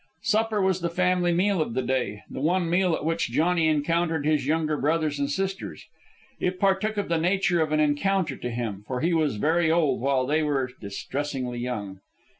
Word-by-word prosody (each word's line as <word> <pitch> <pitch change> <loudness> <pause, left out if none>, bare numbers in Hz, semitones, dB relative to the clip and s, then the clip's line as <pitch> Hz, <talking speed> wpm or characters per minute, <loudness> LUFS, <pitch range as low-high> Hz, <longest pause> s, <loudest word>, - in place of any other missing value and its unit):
Supper 220 0 +1
was 190 -1 +1
the 170 - -1
family 180 0 +1
meal 185 +1 +2
of 120 -7 -3
the 130 - 0
day 125 -5 -2
the - - -7
one 175 +3 +1
meal 175 0 +2
at 150 - -5
which 165 -4 0
Johnny 165 +5 +2
encountered 160 +1 +1
his 150 -3 +1
younger 155 0 +1
brothers 150 0 0
and 140 0 0
sisters. 195 +5 -3 0.5
It 180 0 -1
partook 200 +2 +1
of 205 - -1
the 165 -1 +1
nature 175 0 +2
of 155 -1 0
an 155 - +2
encounter, 155 +1 +1
to 125 - -5
him, 115 -4 -4
for 125 -1 -3
he 170 +1 +1
was 155 -6 +1
very 160 +8 +2
old, 155 -7 +2
while 135 -1 +1
they 150 +4 +1
were 135 -4 0
distressingly 125 +4 -4
young. 105 -6 -4
160 Hz, 195 wpm, -26 LUFS, 135-175 Hz, 0.5 s, meal